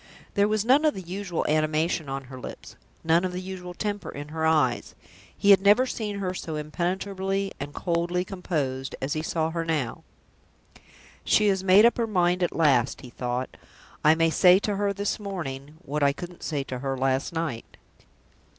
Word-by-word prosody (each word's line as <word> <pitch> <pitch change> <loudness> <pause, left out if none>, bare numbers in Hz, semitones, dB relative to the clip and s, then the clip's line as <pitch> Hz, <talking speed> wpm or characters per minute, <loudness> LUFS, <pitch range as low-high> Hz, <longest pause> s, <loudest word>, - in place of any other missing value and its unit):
There 200 0 +3
was 215 0 0
none 270 +5 +5
of 305 -1 +3
the 190 - -6
usual 180 0 -3
animation 155 0 +1
on 135 0 -4
her 130 0 -10
lips, - - -9 0.3
none 165 +2 +3
of 185 -1 -2
the 180 - -3
usual 185 -1 -7
temper 205 -1 -3
in 145 +1 -7
her 160 0 -1
eyes. 150 -7 +1 0.4
He 200 - +5
had 195 -1 +7
never 205 +6 +5
seen 210 -5 -4
her 185 -2 -2
so 160 -3 -5
impenetrably 190 +5 -2
and 140 +1 -5
coldly 175 +2 -1
composed 145 -9 -3
as 135 +2 -2
he 155 - -2
saw 160 0 -1
her 165 0 -2
now. 150 -8 -2 1.2
"She 210 -1 +4
has 190 -1 0
made 195 +3 +7
up 235 - +4
her 230 -1 0
mind 180 -3 +1
at 175 - 0
last," 135 -6 +2
he 125 - -11
thought. 125 +1 -3 0.5
"I 155 +1 +6
may 165 0 +2
say 180 +2 +6
to 205 +1 -1
her 200 0 +1
this 200 +2 -2
morning 150 -8 -6
what 150 +2 -2
I 140 0 +4
couldn't 175 +3 -9
say 145 -3 -2
to 130 -1 -6
her 135 0 -2
last 135 +3 0
night." 160 -8 -4
170 Hz, 185 wpm, -26 LUFS, 145-195 Hz, 1.2 s, had